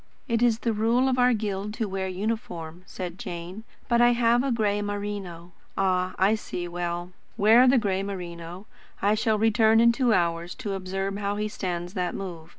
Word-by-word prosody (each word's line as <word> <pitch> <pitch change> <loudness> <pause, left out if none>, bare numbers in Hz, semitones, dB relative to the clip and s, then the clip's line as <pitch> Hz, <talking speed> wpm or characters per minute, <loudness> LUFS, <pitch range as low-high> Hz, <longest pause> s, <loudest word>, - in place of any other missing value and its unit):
"It 230 -1 0
is 235 -2 +4
the 230 -1 -1
rule 230 +5 +2
of 255 -1 +1
our 250 0 +5
guild 210 -2 -2
to 225 -3 -2
wear 190 -1 -3
uniform," 180 -4 -4
said 180 -1 -6
Jane; 175 +5 -7 0.2
"but 235 -1 +3
I 240 0 +6
have 235 +1 +3
a 275 - 0
grey 210 -3 +1
merino." 200 -4 -5 0.3
"Ah, 185 -1 +1
I 195 +3 +4
see. 180 -5 -4
Well, 175 0 -4 0.3
wear 225 +5 +6
the 260 +1 +5
grey 195 -4 0
merino. 180 -1 -7 0.3
I 205 +1 +2
shall 215 0 +1
return 220 +1 +4
in 235 0 +6
two 245 0 +1
hours 170 -2 0
to 215 -6 -4
observe 195 +1 -3
how 200 0 -1
he 210 +1 -1
stands 180 -5 -4
that 180 -3 -2
move. 170 -4 -7
200 Hz, 185 wpm, -26 LUFS, 180-225 Hz, 0.3 s, I